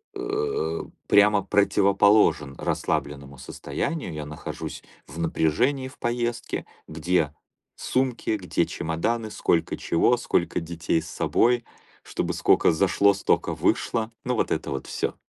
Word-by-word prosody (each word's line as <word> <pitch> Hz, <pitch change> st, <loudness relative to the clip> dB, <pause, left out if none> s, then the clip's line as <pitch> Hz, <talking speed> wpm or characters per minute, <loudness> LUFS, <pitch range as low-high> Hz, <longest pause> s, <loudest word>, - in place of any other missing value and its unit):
э, 425 Hz, +2 st, -2 dB, 0.2 s
прямо 105 Hz, -1 st, +5 dB
противоположен 100 Hz, -6 st, +3 dB
расслабленному 70 Hz, -1 st, -3 dB
состоянию, 115 Hz, -, -4 dB
я 75 Hz, -1 st, -5 dB
нахожусь 75 Hz, +1 st, -7 dB, 0.2 s
в 75 Hz, +4 st, -9 dB
напряжении 120 Hz, -, +1 dB
в 130 Hz, -, -14 dB
поездке, 120 Hz, 0 st, -2 dB, 0.2 s
где 80 Hz, -2 st, 0 dB, 0.4 s
сумки, 130 Hz, -3 st, -1 dB
где 90 Hz, -2 st, 0 dB
чемоданы, 110 Hz, +8 st, -2 dB
сколько 85 Hz, -5 st, 0 dB
чего, 120 Hz, +8 st, +2 dB
сколько 90 Hz, -8 st, 0 dB
детей 85 Hz, 0 st, -1 dB
с -, -, -10 dB
собой, 120 Hz, 0 st, +2 dB, 0.4 s
чтобы -, -, -3 dB
скока -, -, +4 dB
зашло, 100 Hz, +4 st, +3 dB
стока 100 Hz, -, 0 dB
вышло, 115 Hz, 0 st, 0 dB
ну, 125 Hz, 0 st, 0 dB
вот -, -, 0 dB
это 80 Hz, -2 st, -2 dB
вот 65 Hz, -1 st, -4 dB
всё. -, -, -2 dB
100 Hz, 120 wpm, -25 LUFS, 80-120 Hz, 0.4 s, прямо